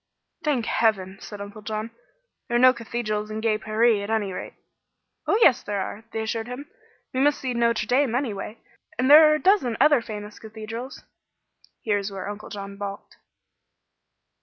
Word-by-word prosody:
"Thank 275 -7 0
heaven," 195 -4 0
said 205 -1 -8
Uncle 205 +2 -9
John, 215 +1 -4 0.6
"there 240 - -2
are - - +4
no 255 +1 +7
cathedrals 220 -3 -3
in 215 0 -4
gay 220 -1 +1
Paree, 220 0 +2
at 200 - -6
any 210 -4 0
rate." - - -7 0.7
"Oh, - - +3
yes 255 -5 +6
there 205 -1 -3
are," 210 +3 -5
they 220 - -3
assured 225 +1 -3
him. 255 +4 -7 0.5
"We 260 - -1
must 290 +2 +3
see 255 -2 -2
Notre 235 -2 +1
Dame, 250 +1 +2
anyway; 225 -4 -3 0.4
and 260 +2 +2
there 305 +1 +10
are - - +4
a - - -2
dozen 365 - +3
other 290 -1 +5
famous 210 -1 -8
cathedrals." 225 +3 -8 0.8
Here 205 -2 +1
is 200 0 -5
where 195 -1 -6
Uncle 205 +1 -7
John 200 -1 -7
balked. 200 0 -7
225 Hz, 175 wpm, -24 LUFS, 210-250 Hz, 0.8 s, there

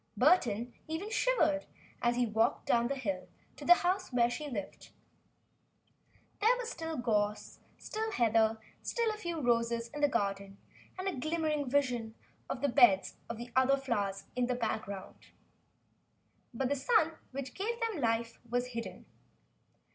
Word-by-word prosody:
Burton 245 - +3
even 330 +7 -4
shivered 320 -13 +2 0.3
as 240 0 +2
he 245 0 +2
walked 225 +1 +1
down 235 0 +3
the 275 - -1
hill 200 -8 -3 0.3
to - - -10
the 350 - +8
house 370 -1 0
where 240 -1 +3
she 300 +4 -4
lived. 205 -7 -6 1.5
There 460 +4 +4
was 480 -2 -4
still 325 -1 -4
gorse, 210 -3 -1 0.2
still 440 +1 -3
heather, 225 - +3 0.2
still 465 -2 0
a - - -7
few 345 -5 -4
roses 235 -2 +1
in 295 +3 -6
the 290 - +6
garden 200 -5 -2 0.4
and 370 +1 -3
a 385 - 0
glimmering 310 -1 -1
vision 245 -5 0 0.3
of 255 - -3
the 285 - +3
beds 240 -8 +5
of 230 -1 -5 0.2
other 260 +1 +4
flowers 200 -7 -2
in 250 -1 +1
the 250 - 0
background. 215 -4 -4 1.3
But 255 +2 -1
the 285 - +2
sun 325 - +2
which 265 -1 -6
gave 460 +5 -3
them 450 - -1
life 230 0 0
was 245 +1 0
hidden. 230 -1 -6
250 Hz, 150 wpm, -32 LUFS, 230-320 Hz, 1.5 s, the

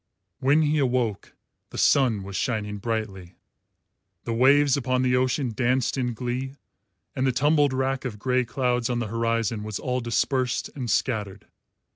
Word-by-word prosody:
When 145 +4 +3
he 150 0 +1
awoke, 125 -6 -1 0.4
the - - -9
sun 120 -8 +3
was 100 0 -8
shining 105 -2 -2
brightly, 100 -5 -4 0.9
the 115 - -3
waves 140 +3 +4
upon 130 -2 0
the 125 0 +2
ocean 130 0 0
danced 125 +2 +1
in 125 -3 -2
glee, 125 +3 -4 0.6
and 130 +1 +1
the - - +3
tumbled 145 +2 +3
rack 130 0 -1
of 120 -5 -5
grey 125 +3 +1
clouds 125 0 -1
on 120 - 0
the 120 -3 -3
horizon 115 -2 0
was 105 -1 -4
all 125 -1 -2
dispersed 125 +1 -1
and 125 -4 -5
scattered. 105 -6 -1
125 Hz, 155 wpm, -25 LUFS, 115-130 Hz, 0.9 s, waves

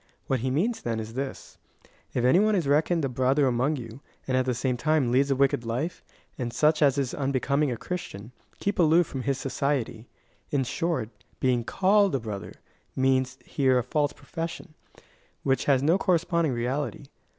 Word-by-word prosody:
What 130 - 0
he 130 +3 -1
means, 190 - 0
then, 115 -1 -2
is 110 +1 -6
this: 135 +2 -6 0.3
" - - -34
If 125 - +1
any 130 +8 +5
one 215 +1 +3
is 170 -7 0
reckoned 155 +2 +2
a - - +1
brother 130 +3 +2
among 130 +4 +1
you, 120 0 -8 0.3
and 130 - 0
at 130 0 +2
the 125 - +1
same 130 +1 0
time 145 -1 +1
leads 135 +3 +3
a 135 - +2
wicked 135 -3 +2
life, 125 +9 -3 0.4
and 120 -2 -2
such 155 +4 +2
as 140 -2 +4
is 135 -3 -1
unbecoming 140 +1 0
a 120 - -3
Christian, 115 - -6 0.3
keep 200 0 -2
aloof 165 +1 +5
from 135 -3 -5
his 135 +1 -1
society." 130 -4 -2 0.4
In 140 -2 +1
short, 145 -3 -2 0.3
being 125 -2 +1
called 195 - +3
a - - +1
brother, 105 -4 -6 0.4
means 130 0 +1
here 130 -3 +2
a 125 - +1
false 145 +3 0
profession, 165 0 -6 0.7
which 135 -1 +1
has 135 -2 +3
no 165 +6 +3
corresponding 170 -5 +1
reality. 125 +2 -2
135 Hz, 185 wpm, -26 LUFS, 125-155 Hz, 0.7 s, any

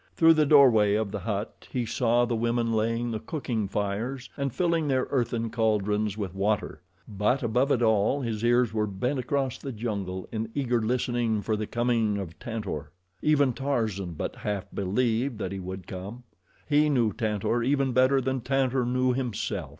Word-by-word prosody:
Through 165 0 +6
the 155 -2 +3
doorway 120 -9 +6
of 105 -2 -1
the 105 - -3
hut 100 +2 -4
he 125 -2 -1
saw 120 +1 +2
the 120 -1 -1
women 115 0 0
laying 115 +2 0
the 110 - -2
cooking 115 -5 -3
fires 105 +7 -3
and 140 -1 -2
filling 170 0 +1
their 130 -2 +1
earthen 120 -3 0
caldrons 105 -2 0
with 100 -4 -4
water; 105 +2 -1 0.3
but 105 +6 0
above 125 +4 +1
it 120 - +2
all 110 +5 +2
his 115 -3 -3
ears 120 -1 +3
were 105 -1 0
bent 125 +8 -2
across 130 0 -1
the 135 - -5
jungle 100 -5 -4
in 110 0 -3
eager 125 -4 +1
listening 120 -2 0
for 110 - 0
the 105 0 -3
coming 115 -3 +1
of 90 -5 -6
Tantor. 105 -11 -5 0.3
Even 145 -4 +3
Tarzan 110 -10 -2
but 75 - -5
half 105 -2 -3
believed 115 +5 0
that 95 -3 -4
he 100 - -4
would 95 0 -7
come. 100 +7 -7 0.4
He 150 0 +3
knew 120 -7 +2
Tantor 110 +2 -1
even 135 +2 +1
better 130 +2 +4
than 130 0 -1
Tantor 130 -1 +1
knew 125 0 +2
himself. 125 -4 -3
115 Hz, 175 wpm, -27 LUFS, 105-130 Hz, 0.4 s, Through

